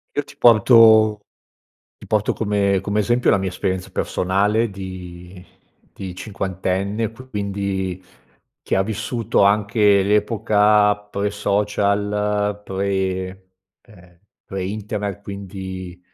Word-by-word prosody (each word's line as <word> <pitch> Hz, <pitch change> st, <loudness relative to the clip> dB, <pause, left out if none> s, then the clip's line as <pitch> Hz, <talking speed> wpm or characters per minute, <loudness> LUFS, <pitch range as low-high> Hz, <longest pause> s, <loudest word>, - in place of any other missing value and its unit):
Io 145 Hz, -, 0 dB
ti -, -, -16 dB
porto 110 Hz, -2 st, +6 dB, 0.7 s
ti -, -, -13 dB
porto 105 Hz, -1 st, +1 dB
come 100 Hz, -3 st, 0 dB
come 100 Hz, +2 st, 0 dB
esempio, 120 Hz, +4 st, +1 dB
la -, -, +4 dB
mia 95 Hz, 0 st, -2 dB
esperienza 95 Hz, 0 st, -3 dB
personale 105 Hz, +5 st, 0 dB
di 90 Hz, -1 st, -9 dB, 0.5 s
di 95 Hz, -2 st, -8 dB
cinquantenne. 100 Hz, +2 st, -3 dB
Q 130 Hz, +3 st, -14 dB
quindi, 100 Hz, -3 st, -3 dB, 0.6 s
che -, -, -2 dB
ha 95 Hz, -, +2 dB
vissuto 110 Hz, +2 st, -1 dB
anche 100 Hz, 0 st, +3 dB
l'epoca 105 Hz, 0 st, +3 dB
pre 105 Hz, 0 st, -4 dB
social, 105 Hz, 0 st, 0 dB
pre 95 Hz, -1 st, -3 dB, 0.3 s
ehm, 90 Hz, -5 st, -20 dB, 0.3 s
pre 95 Hz, -1 st, -5 dB
internet, 100 Hz, 0 st, -4 dB
quindi 95 Hz, -2 st, -7 dB
100 Hz, 110 wpm, -21 LUFS, 95-105 Hz, 0.7 s, porto